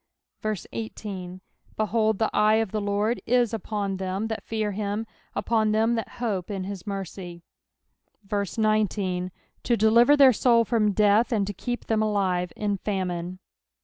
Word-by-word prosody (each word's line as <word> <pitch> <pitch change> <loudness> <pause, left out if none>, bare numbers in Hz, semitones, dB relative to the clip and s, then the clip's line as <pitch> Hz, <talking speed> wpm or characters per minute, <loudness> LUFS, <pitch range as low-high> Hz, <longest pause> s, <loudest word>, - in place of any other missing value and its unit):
18 190 -5 -6 0.4
Behold, 215 0 +1
the 220 - 0
eye 215 +1 +4
of 220 -3 0
the 215 - -1
Lord 205 +3 0
is 240 -1 +2
upon 205 -3 -2
them 190 +3 -3
that 220 -2 -3
fear 215 -2 -2
him, 205 +2 -2 0.3
upon 220 -2 +1
them 225 +2 +2
that 225 -2 -3
hope 210 -7 -2
in 195 -2 -3
his 195 +1 -7
mercy; 185 -3 -6 1.1
19 205 -4 0 0.3
To 235 - +1
deliver 235 +7 +5
their 270 -3 +7
soul 230 0 +4
from 215 -3 +2
death, 210 +5 +3
and 210 -4 +1
to 205 - -4
keep 245 +5 -4
them 220 -1 +1
alive 190 -5 0
in 205 -1 -1
famine. 185 -3 -3
210 Hz, 145 wpm, -26 LUFS, 195-225 Hz, 1.1 s, their